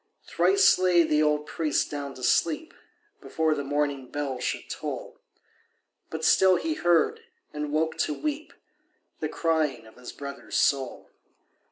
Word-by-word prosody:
Thrice 395 - +4
lay 180 -2 +4
the 150 -1 +2
old 150 -1 +1
priest 155 -3 -1
down 140 -2 -5
to 130 - -11
sleep 170 - +1 0.5
Before 160 -1 0
the 145 - -3
morning 140 -2 -2
bell 140 -3 -3
should - - -3
toll; - - -6 0.9
But 160 0 -4
still 190 -1 +5
he 320 - -1
heard—and 160 - -1
woke 160 +1 0
to 155 - +1
weep— 305 - -4 0.7
The - - -2
crying 160 -7 0
of 110 - -17
his 125 -1 -9
brother's 140 -1 -6
soul. 135 -3 0
150 Hz, 140 wpm, -26 LUFS, 140-170 Hz, 0.9 s, still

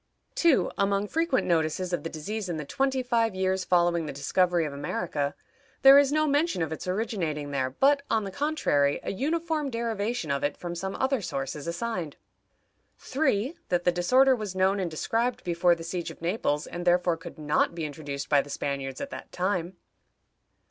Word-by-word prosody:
2. 335 -6 +3
Among 200 +1 +1
frequent 325 0 +1
notices 170 +2 0
of 175 - 0
the 165 - -5
disease 195 +6 -5
in 170 - -2
the 150 - -5
twenty 265 - 0
five 230 -4 +1
years 190 0 0
following 175 -2 +2
the - - -3
discovery 170 +5 +1
of 145 - -5
America, 145 0 -2 0.5
there 270 +1 +10
is 285 -1 +3
no 310 +1 +2
mention 290 - +1
of 160 - -4
its 160 - -5
originating 180 -8 -2
there, 130 -2 0
but, 280 - +3
on 220 -1 +1
the 195 - -5
contrary, 185 - +1
a - - -2
uniform 310 - -1
derivation 230 - -2
of 140 - -1
it 145 - -1
from 175 -1 -5
some 190 +3 -4
other 265 -2 0
source 135 -7 -3
is 150 +1 -7
assigned. 170 -3 -3 0.8
3. 265 0 0
That 175 -1 +1
the 180 - +4
disorder 255 +10 +4
was 210 -5 -5
known 190 +2 +2
and 180 -3 -1
described 230 +10 -1
before 175 0 +3
the 165 - -9
siege 170 +1 -4
of - - -11
Naples, 165 -4 -1
and 175 - -6
therefore 175 -1 +3
could 165 - -10
not 150 +2 +1
be 165 -2 -3
introduced 145 -2 -5
by 145 -2 +4
the 145 - -12
Spaniards 140 -2 -3
at 280 - -5
that - - -8
time. 180 -1 -2
180 Hz, 190 wpm, -27 LUFS, 160-235 Hz, 0.8 s, there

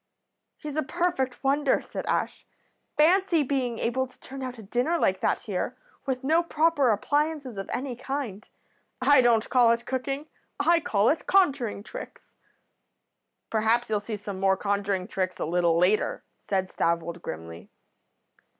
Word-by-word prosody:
"'He's 300 -1 -6
a - - +3
perfect 275 -4 -1
wonder,' 275 0 +2
said - - -7
Ash. - - -1 0.5
'Fancy 345 +1 +4
being 255 -4 -1
able 260 +4 0
to 255 - -24
turn 270 0 -9
out 255 -1 -5
a 220 - -10
dinner 245 - 0
like - - +1
that - - +1
here, - - -3 0.3
with 260 -1 -2
no 320 +5 +3
proper 320 -5 +2
appliances 285 +4 0
of 195 -1 -6
any 260 -1 -3
kind. 250 -5 -5 0.5
I 270 +1 +6
don't 235 -2 +3
call 245 -2 +5
it 235 0 -4
cooking; 270 +3 -3 0.3
I 335 +4 +4
call 210 -8 +2
it 315 - -1
conjuring 275 - +2
tricks.' - - -10 1.2
"'Perhaps 225 +1 +1
you'll 210 - +2
see 210 +1 -5
some 200 -2 -6
more 190 0 +3
conjuring 200 -2 -1
tricks 185 -3 -2
a - - -1
little 170 0 +2
later,' 185 +5 +2 0.3
said 190 -2 0
Stavold, 170 0 -1
grimly. 85 - -8
245 Hz, 150 wpm, -27 LUFS, 200-285 Hz, 1.2 s, I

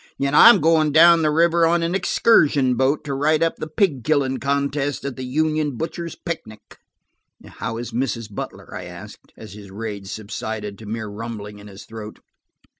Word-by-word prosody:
I'm 150 +10 +6
going 155 -1 +3
down 170 +1 +7
the 155 - +2
river 165 +2 +3
on 170 0 +1
an 170 +1 -1
excursion 150 - +3
boat, 135 +5 0
and 135 -1 -3
write 155 +2 +2
up 165 - 0
the - - -5
pig 155 - 0
killing 135 -3 0
contest 140 +1 -2
at 140 -2 -4
the 130 - -8
union 155 +1 -1
butchers' 170 +2 -5
picnic." 110 - -8 0.7
"How 115 0 -6
is 120 +1 -6
Mrs. 115 -3 -2
Butler?" - - -8
I - - -6
asked, 90 +4 -12
as 105 -3 -11
his 100 -1 -12
rage 100 -1 -6
subsided 105 0 -6
to 110 - -11
mere 110 0 -4
rumbling 105 -1 -7
in 100 - -13
his 100 -1 -12
throat. 110 -1 -9
135 Hz, 175 wpm, -21 LUFS, 110-155 Hz, 0.7 s, down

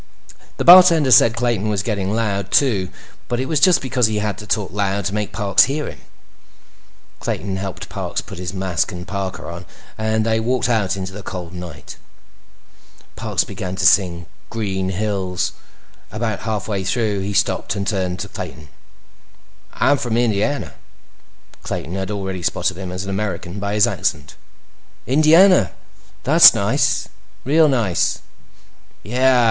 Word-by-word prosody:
The - - -2
bartender 170 -6 +8
said 115 -1 +6
Clayton 120 -4 -1
was 100 -2 -1
getting 100 -3 -2
loud, 100 -4 -1
too, 100 -8 +2 0.4
but 120 0 -2
it 130 - -1
was 150 +2 0
just 185 -6 +4
because 125 -3 +1
he 110 -1 -2
had 105 -1 -2
to 105 - -9
talk 105 -4 -1
loud 100 0 -1
to 100 - -2
make 105 -1 -2
Parks 100 -3 +3
hear 145 +3 -3
him. - - -9 1.2
Clayton 95 -1 -3
helped 95 -1 -6
Parks - - -4
put - - -9
his 90 -1 -4
mask 95 -3 -2
and 90 0 -8
parka 100 -2 -5
on 85 +1 -7 0.4
and 110 0 0
they 110 0 +1
walked 125 +2 0
out 105 -5 0
into 95 0 -6
the 105 - -8
cold 90 -3 -7
night. 90 -5 -9 1.2
Parks - - -1
began 95 0 -6
to - - -2
sing 90 -3 +3 0.2
Green 95 -4 -3
Hills. 95 -2 -2 0.6
About 110 -1 -3
halfway 100 -2 -2
through, 105 0 -1
he 95 +1 -3
stopped - - 0
and 100 -1 -3
turned 95 -4 -2
to - - -5
Clayton. 75 -1 -9 1.1
"I'm 145 - +3
from 120 -2 -1
Indiana." 110 - 0 0.9
Clayton 85 - -5
had 95 0 -4
already 95 -3 -4
spotted 85 - -1
him 95 0 -7
as 90 +1 -4
an 100 - -5
American 95 -2 -4
by 100 +1 -3
his 105 - +5
accent. - - -2 0.7
"Indiana? 155 - +5 0.5
That's - - +8
nice. - - +1 0.4
Real 155 +4 +4
nice." 110 -10 0 0.8
"Yeah. 125 +3 +2
100 Hz, 155 wpm, -19 LUFS, 95-115 Hz, 1.2 s, bartender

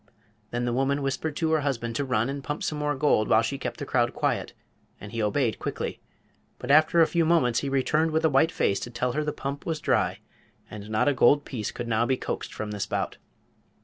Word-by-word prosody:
Then 120 +1 -2
the 120 - -1
woman 135 +3 0
whispered 145 +3 -2
to 160 -1 0
her 160 - +3
husband 120 -5 -2
to - - 0
run 125 -4 0
and 140 0 -4
pump 150 +2 -4
some 150 - -2
more 145 0 0
gold 130 -6 +2
while 110 - +4
she 135 +4 -3
kept - - -4
the - - -5
crowd - - +1
quiet, - - -1 0.5
and 100 - -9
he 115 - -2
obeyed 110 +2 0
quickly. - - -4 0.6
But 125 - -3
after 155 +3 +5
a - - +7
few 170 +1 +1
moments 155 -8 +3
he 140 - -3
returned 150 +4 +1
with 160 0 +1
a - - +7
white 155 +4 +3
face 100 - +1
to - - -6
tell 125 +1 -1
her 150 +4 -1
the 150 - -1
pump 140 -1 -5
was 160 -2 -1
dry, - - +1 0.5
and 105 0 -8
not 110 +5 +1
a 145 - +4
gold 140 +3 +4
piece 110 -6 -4
could 120 - -6
now 115 +1 +1
be 130 - +1
coaxed - - -4
from 110 -1 -5
the 105 - -5
spout. - - -2
135 Hz, 235 wpm, -26 LUFS, 115-150 Hz, 0.6 s, a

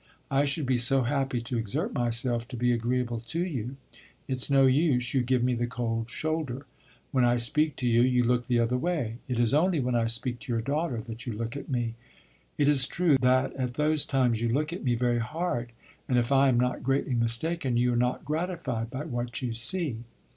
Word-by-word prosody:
I 140 +1 +3
should 140 +1 0
be 130 -1 +1
so 130 +2 +4
happy 135 -1 -1
to 120 0 -3
exert 110 -3 -3
myself 120 0 0
to 125 - -7
be 125 +1 +2
agreeable 120 0 -1
to 160 +10 -3
you. 130 -6 -5 0.5
It 130 -1 -2
's - - +2
no 135 -1 +5
use; 130 -3 +2
you 135 - +3
give 125 0 +1
me 125 0 +2
the 120 0 -1
cold 115 -2 -3
shoulder. 150 -2 -3 0.5
When 130 -2 +2
I 120 0 +3
speak 150 +6 +3
to 125 - -2
you, 120 0 +4
you 125 0 +3
look 120 0 +1
the 125 - +2
other 120 +2 +1
way; 135 -8 -2
it 125 - -2
is 120 0 +2
only 165 +2 +3
when 125 -1 -1
I 115 -1 +1
speak 120 +1 0
to 115 - -7
your 115 - 0
daughter 145 -1 -1
that 115 +1 -9
you 120 - -2
look 115 +4 -4
at 140 - -7
me. 120 -3 -1 0.6
It 145 - +2
is 140 -3 +5
true 175 -5 +2
that 130 +1 +2
at 125 -2 -3
those 150 0 +1
times 125 -4 +1
you 120 - 0
look 150 +7 -1
at 180 - -6
me 125 -3 +1
very 120 0 +1
hard, 125 -2 -3 0.4
and 125 - +2
if 120 +2 0
I 135 0 +5
am 120 -2 +2
not 125 0 0
greatly 135 +1 0
mistaken, 120 +4 0
you 125 0 +2
are - - 0
not 125 +1 0
gratified 155 -7 -3
by 135 +5 -5
what 120 -3 -4
you 120 -2 -2
see. 125 +3 0
125 Hz, 220 wpm, -27 LUFS, 120-140 Hz, 0.6 s, no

